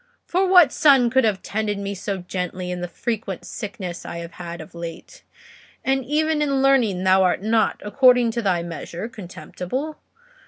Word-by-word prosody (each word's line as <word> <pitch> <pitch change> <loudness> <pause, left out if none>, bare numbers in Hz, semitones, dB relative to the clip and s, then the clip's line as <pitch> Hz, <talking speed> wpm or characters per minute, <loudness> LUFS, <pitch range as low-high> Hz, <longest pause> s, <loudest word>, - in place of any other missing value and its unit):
For 375 +2 +1
what 355 -7 +7
son 270 -6 +4
could 265 +1 +4
have 200 -3 0
tended 210 -1 -2
me 200 0 -4
so 195 +1 -4
gently 180 0 -4
in 180 0 -4
the 175 - -3
frequent 205 +1 -4
sickness 185 -4 -6
I - - -6
have 170 0 -7
had 170 0 -8
of 160 - -11
late? 170 -1 -8 0.6
And 270 0 +1
even 305 +3 +1
in 275 -2 +1
learning 235 -9 +3
thou 190 0 +5
art 185 +1 +1
not, 220 +1 +1
according 245 +1 +4
to 235 +1 -2
thy 180 -5 +1
measure, 170 +3 -6
contemptible. 230 - -6
210 Hz, 170 wpm, -22 LUFS, 180-265 Hz, 0.6 s, what